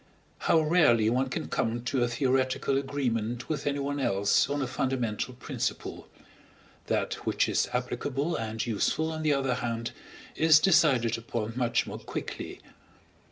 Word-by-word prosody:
How 165 - +6
rarely 145 -9 +4
one 130 +2 +1
can - - -3
come 115 +1 -1
to 125 0 0
a - - +2
theoretical 130 +2 +1
agreement 120 -4 -2
with 155 -2 -2
anyone 145 0 -1
else 100 -1 +2
on 145 -1 -1
a - - 0
fundamental 125 -2 -2
principle. 125 - -4 0.8
That - - 0
which - - +2
is - - +1
applicable 140 +5 -2
and 110 0 -3
useful, 135 +8 0
on 160 0 -4
the 155 -2 +2
other 135 -2 +1
hand, 115 -1 -3 0.4
is 155 -1 +6
decided 140 - +3
upon 115 -1 -4
much 120 -2 +1
more - - -7
quickly. - - -6
130 Hz, 145 wpm, -28 LUFS, 115-145 Hz, 0.8 s, How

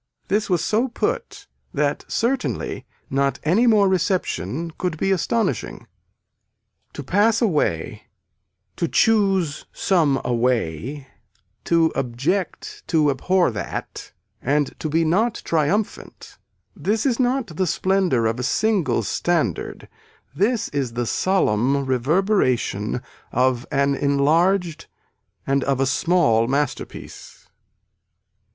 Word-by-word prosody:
This 210 +1 0
was 175 -3 +1
so 225 +5 +1
put 475 - -3 0.3
that - - 0
certainly 250 +3 -2 0.2
not 140 0 0
any 195 +11 +3
more 210 -3 +5
reception 170 - -1
could 180 -3 -2
be 195 - 0
astonishing. 225 +5 -1 1.1
To - - -6
pass 215 +4 +2
away, 150 - -1 0.7
to 170 - 0
choose 195 -8 +2
some 155 -8 +2
away, 125 - -1 0.6
to 165 -1 +3
object 140 +10 -2
to 155 -3 +3
abhor 175 +3 +1
that 105 -2 -6 0.3
and 145 +2 0
to 155 - -3
be 165 +2 +2
not 210 +8 +1
triumphant 170 +7 -2 0.4
this 215 +4 -1
is 255 -3 +1
not 250 - 0
the 185 +2 0
splendor 185 -11 +1
of 110 +2 0
a - - -2
single 180 - +1
standard 155 - -1 0.5
this 215 - +1
is 135 -5 -2
the 120 0 -2
solemn 140 - +1
reverberation 130 - 0 0.3
of 125 0 +1
an 140 0 +2
enlarged 160 +5 +1 0.6
and 135 0 +1
of 135 -2 0
a 135 - +3
small 135 -5 +2
masterpiece. 140 +1 -4
160 Hz, 110 wpm, -22 LUFS, 130-195 Hz, 1.1 s, more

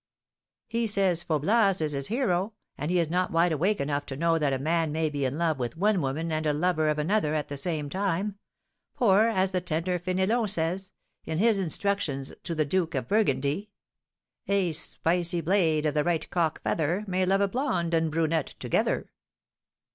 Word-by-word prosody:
"He 230 0 -1
says 195 -5 +1
Faublas 195 +6 +2
is 155 -2 0
his 140 -1 -1
hero, 215 -4 0 0.2
and 150 +3 -4
he 180 - +2
is 170 -2 +2
not 180 +3 0
'wide 170 +1 +2
awake' 185 +7 +1
enough 145 0 -1
to 135 - -5
know 165 +1 +2
that 145 -3 +1
a 135 - 0
man 160 +3 0
may 155 0 0
be 140 -2 -1
in 130 +3 -2
love 160 -4 0
with 120 +3 -3
one 200 0 +2
woman 155 +4 -2
and 155 0 -1
a 150 - +2
lover 155 0 +1
of 150 - 0
another 155 0 +1
at 150 - -2
the 145 - -4
same 150 0 -2
time; 195 +4 -2 0.6
for, 215 -1 +4
as 190 -3 +1
the 180 -1 0
tender 175 +1 -1
Fénélon 190 +5 0
says, 185 +1 -2 0.3
in 160 - -3
his 215 +1 +3
Instructions 165 -6 -1
to 170 - -4
the 155 -1 +1
Duke 165 +1 0
of 130 -3 -2
Burgundy: 155 -1 +1 0.8
'A 195 -3 +2
spicy 170 +2 0
blade, 165 -3 +2
of 150 - +1
the 150 0 +1
right 170 -1 0
cock 165 -3 0
feather, 170 +6 0
May 185 0 0
love 195 +2 +2
a 200 - +3
blonde 190 - -1
and 165 -1 +2
brunette 160 -1 0
together.'" - - 0
170 Hz, 190 wpm, -27 LUFS, 155-195 Hz, 0.8 s, for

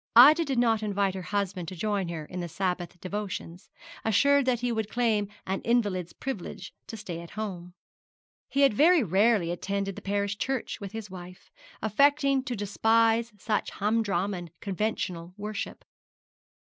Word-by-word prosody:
Ida 295 +8 +9
did 270 -3 -1
not 225 -2 +3
invite 200 -2 0
her 190 - -5
husband 190 -2 -2
to 185 - -6
join 200 0 -1
her 160 -3 -5
in 180 +3 -6
her 175 - -3
Sabbath 180 0 -3
devotions, 185 -2 -5 0.3
assured 280 +5 +4
that 245 -2 +2
he 245 -1 0
would 220 -2 -2
claim 220 -4 +1 0.2
an 190 +1 -2
invalid's 205 -7 +1
privilege 200 -7 -6
to 225 - -7
stay 180 -5 -6
at 170 - -10
home. 180 -5 -5 0.7
He 280 - +1
had 275 -5 +6
very 320 - +5
rarely 195 -1 +3
attended 195 +2 -2
the - - -8
parish 200 +1 -1
church 265 -5 -2
with 200 -1 -6
his 220 -3 -7
wife, 180 0 -11 0.3
affecting 275 +4 +3
to 250 - -2
despise 225 +3 +2
such 210 +1 -1
humdrum 205 -2 0
and 175 -2 -6
conventional 185 -3 -3
worship. 210 0 -5
205 Hz, 160 wpm, -28 LUFS, 185-230 Hz, 0.7 s, Ida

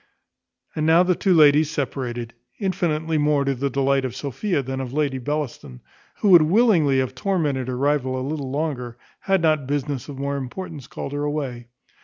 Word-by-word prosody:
And 155 0 0
now 165 +2 +6
the 180 0 +2
two 190 +2 0
ladies 150 -1 +5
separated, 125 -6 -4 0.2
infinitely 165 -5 -1
more 145 -1 +2
to 135 - +1
the 135 +2 -2
delight 135 +1 +1
of 130 -3 -4
Sophia 145 - -2
than 130 +1 -4
of 125 -2 -5
Lady 140 -2 -1
Bellaston, 130 - -4 0.4
who 205 - +3
would 175 -3 +9
willingly 165 - +3
have 130 -1 0
tormented 145 -5 -1
her 125 -1 -3
rival 135 -2 0
a 130 - -3
little 145 -3 -4
longer, 130 -5 -3 0.2
had 195 -3 +1
not 155 -4 +2
business 140 -2 -3
of 140 - -7
more 140 +1 -2
importance 145 +1 -7
called 140 - -6
her 145 0 -2
away. 135 -5 -3
145 Hz, 180 wpm, -23 LUFS, 130-155 Hz, 0.4 s, would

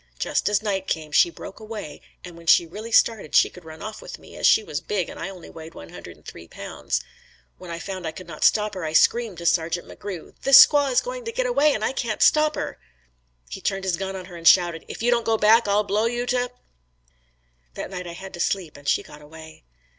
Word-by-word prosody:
Just - - 0
as 210 0 +1
night 195 -3 -2
came, 155 -1 -3
she 345 - +5
broke 200 - -11
away 215 -8 -8 0.2
and 175 -2 -10
when 170 0 -15
she 170 - +6
really 210 +7 -9
started 225 -8 +2
she - - +5
could 180 - -14
run 160 -1 -11
off 215 0 -7
with - - -9
me, - - -15
as - - +2
she 220 - +5
was 150 -5 -5
big 185 +1 -2
and - - -10
I 180 - -4
only 185 -3 -11
weighed 160 0 -11
one 80 - -11
hundred - - -11
and - - -26
three 85 - -11
pounds. 60 - -4 0.6
When 180 - -11
I 170 - -5
found 185 -1 -6
I - - -3
could 185 - -10
not 165 -2 -7
stop 210 -1 +3
her, 185 - -6
I 155 -1 -3
screamed 225 +2 +3
to 170 - -8
Sargeant 170 0 0
MCGrew, 190 -5 -8
"This 275 0 +10
squaw 285 -2 +1
is 250 - +3
going - - -6
to 460 - -3
get - - -1
away 305 - +3
and 215 - -2
I - - -1
can't 230 -5 -1
stop 305 0 +4
her." - - -5 0.7
He 65 - -8
turned 195 -1 -2
his 185 -2 0
gun 190 +2 -5
on 185 -1 -7
her 180 -1 -12
and 165 -1 -2
shouted, 175 -3 +4
"If - - -7
you 240 - +3
don't 235 -1 +2
go 225 0 +1
back, 220 +2 +4
I'll 205 +1 +2
blow 205 +2 0
you 240 +1 -2
to 245 0 0
h 250 - -11 0.6
." - - -42
That - - -6
night 180 -1 -6
I 170 - -7
had 190 +2 -10
to 175 - -9
sleep 175 -3 -2
and 145 0 -13
she - - +2
got 150 - -14
away. 160 - -14
190 Hz, 255 wpm, -23 LUFS, 165-220 Hz, 0.7 s, This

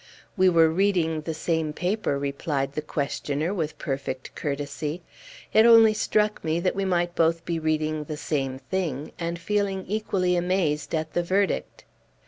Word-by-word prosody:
"We 185 -2 +5
were 165 -2 +5
reading 165 -3 +1
the 160 +1 -4
same 160 -1 -1
paper," 180 -3 -1
replied 140 0 -2
the 150 - -2
questioner, 150 +2 -2
with 160 -6 -3
perfect 135 -1 -4
courtesy; 145 +3 -4 0.5
"it 220 - +7
only 225 -2 +8
struck 215 0 0
me 160 +1 0
that 185 +1 0
we 195 0 -1
might 175 -2 0
both 165 0 +1
be 170 -1 -1
reading 155 -1 -1
the 150 0 -5
same 135 -4 -2
thing, 150 0 -3
and 170 0 -2
feeling 195 +1 -1
equally 190 -3 0
amazed 175 -4 0
at 155 0 -3
the 175 - +1
verdict." 190 +3 -1
165 Hz, 155 wpm, -25 LUFS, 150-185 Hz, 0.5 s, only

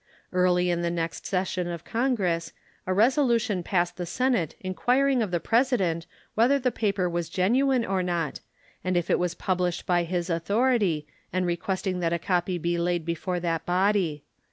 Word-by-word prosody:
Early 180 -1 +3
in 170 0 0
the 170 - 0
next 165 -1 -3
session 185 -1 -1
of 170 -1 -5
Congress 205 -9 0 0.3
a 185 - +1
resolution 230 -3 +3
passed 175 0 0
the 175 -1 -4
Senate 240 - 0
inquiring 250 +8 +1
of 215 - 0
the 175 -1 0
President 195 -8 +1 0.3
whether 245 +6 +4
the 255 -2 0
paper 200 -5 0
was 170 -1 -2
genuine 245 +8 +2
or 190 -1 0
not 170 -5 -2 0.4
and 185 -1 +1
if 175 - 0
it - - +3
was 180 -1 -1
published 180 -2 -1
by 175 -1 +2
his 175 0 -2
authority, 195 - +1 0.3
and 185 +1 0
requesting 185 +1 -2
that 170 -1 0
a - - +2
copy 180 +1 0
be 170 +1 -1
laid 175 -1 0
before 175 +2 -2
that 165 -2 -1
body. 180 -4 +1
180 Hz, 170 wpm, -26 LUFS, 170-210 Hz, 0.4 s, whether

